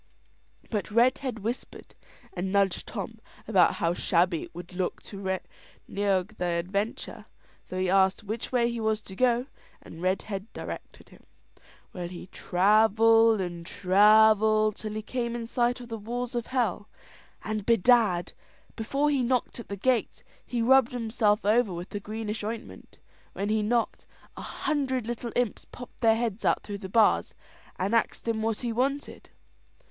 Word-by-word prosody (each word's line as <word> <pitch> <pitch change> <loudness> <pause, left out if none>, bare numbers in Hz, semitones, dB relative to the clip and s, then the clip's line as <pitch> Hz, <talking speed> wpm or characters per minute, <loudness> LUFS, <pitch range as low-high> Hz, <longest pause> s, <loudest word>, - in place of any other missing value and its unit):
But 210 -2 -2
Redhead 250 +2 +2
whispered 225 +4 -6 0.4
and 190 +1 -3
nudged 200 -2 +1
Tom 225 +1 -6 0.3
about 190 -5 +4
how 170 0 0
shabby 175 -1 +1
it - - -11
would 175 +1 -9
look 180 0 -2
to 200 - -9
reneague 195 +1 -3
the 180 - -2
adventure. 200 +6 -3 0.4
So 185 - -7
he 185 - +1
asked 190 +2 +3
which 215 +3 -5
way 240 -2 +2
he 235 - -4
was 220 -1 0
to 190 - -10
go, 245 +1 +2 0.3
and 165 - -12
Redhead 195 +3 -2
directed - - -8
him. - - -18 0.7
Well, 175 -2 -5
he 175 0 -8
travelled 220 +3 +4
and 175 -2 -5
travelled, 215 +3 +4
till 215 -1 -6
he 215 0 -4
came 235 0 -3
in 235 -1 -4
sight 240 +1 0
of 245 -1 -10
the 225 -1 -5
walls 245 +3 -4
of 240 -1 -3
hell; 225 -5 -1 0.5
and, 215 -1 -3
bedad, 225 -5 +3 0.4
before 275 +7 0
he 275 -3 +1
knocked 250 0 0
at 235 - -8
the 200 - -4
gates, 250 +3 0 0.2
he 240 -2 -2
rubbed 260 0 +5
himself 220 -3 +1
over 220 0 +3
with 175 +1 -6
the 205 - -4
greenish 215 +1 -5
ointment. 225 +2 -7 0.4
When 200 +2 -3
he 215 0 +2
knocked, 230 +2 -1 0.3
a - - -8
hundred 265 -6 -2
little 235 0 -4
imps 245 -3 -1
popped 245 -1 -12
their 225 -2 +5
heads 225 -2 -2
out - - +2
through 205 -1 -6
the 190 -2 -7
bars, 220 +2 +3 0.4
and 190 +4 -1
axed 230 0 0
him 225 -1 0
what 220 -1 -1
he 240 -2 -2
wanted. 275 +4 -2
220 Hz, 160 wpm, -27 LUFS, 195-235 Hz, 0.7 s, rubbed